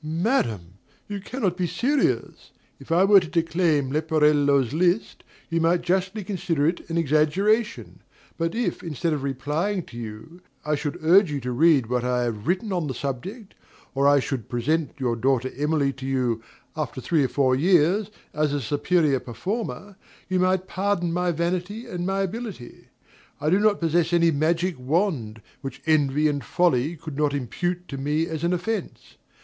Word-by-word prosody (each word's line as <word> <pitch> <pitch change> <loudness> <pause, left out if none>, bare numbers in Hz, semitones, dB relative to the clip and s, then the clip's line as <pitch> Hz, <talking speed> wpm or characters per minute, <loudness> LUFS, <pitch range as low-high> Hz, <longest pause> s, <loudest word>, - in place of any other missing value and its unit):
DOMINIE. 160 +3 -3
Madam, 125 - +1 0.5
you 205 -1 -4
cannot 200 -5 -2
be 180 -1 -1
serious. 270 - 0 0.3
If - - -11
I 175 +3 +5
were 200 0 +7
to 175 - -6
declaim 165 -4 +1
Leporello's 150 -4 +2
list, 180 +6 0 0.2
you 165 0 0
might 170 +2 +2
justly 190 +3 0
consider 175 -6 -1
it 170 +2 -1
an 165 - -1
exaggeration; 175 - +1 0.4
but 165 +4 -2
if, 240 +1 -1
instead 165 0 -2
of 145 - -2
replying 150 +9 -2
to 120 - -12
you, 115 +10 -9 0.2
I 150 - 0
should 145 0 -2
urge 180 +3 +6
you 145 - -2
to 125 +1 -3
read 145 0 +4
what 125 +1 -1
I 125 0 +1
have 110 -3 -4
written 190 +3 0
on 175 -4 -1
the 130 - -4
subject, 185 - -5 0.4
or 140 +1 +2
if 145 - +6
I 145 - +5
should 130 -4 -4
present 145 +6 0
your 125 -4 0
daughter 130 +1 0
Emily 145 -1 +1
to 135 +1 -7
you, 125 -4 0 0.3
after 150 -3 -4
three 155 +3 +1
or - - +2
four 130 -1 +2
years, 180 +6 +3 0.2
as 150 -1 0
a 145 - 0
superior 145 +2 +1
performer, 200 - -5 0.3
you 185 0 0
might 185 0 +1
pardon 185 -3 -1
my 180 0 +1
vanity 180 +7 -2
and 180 -6 -4
my 195 0 0
ability. 200 - -7 0.5
I 150 +2 0
do 190 - +4
not 210 -1 +3
possess 170 +1 +1
any 170 -1 +4
magic 165 +2 0
wand, 130 - -1 0.2
which 135 -2 -6
envy 150 -1 +3
and 145 -2 -1
folly 160 -3 +1
could 155 -2 -8
not 145 -1 +1
impute 175 +7 -3
to 135 - -5
me 150 +4 0
as 160 -1 -5
an 170 - +2
offence. 210 +5 -4
160 Hz, 175 wpm, -24 LUFS, 140-180 Hz, 0.5 s, were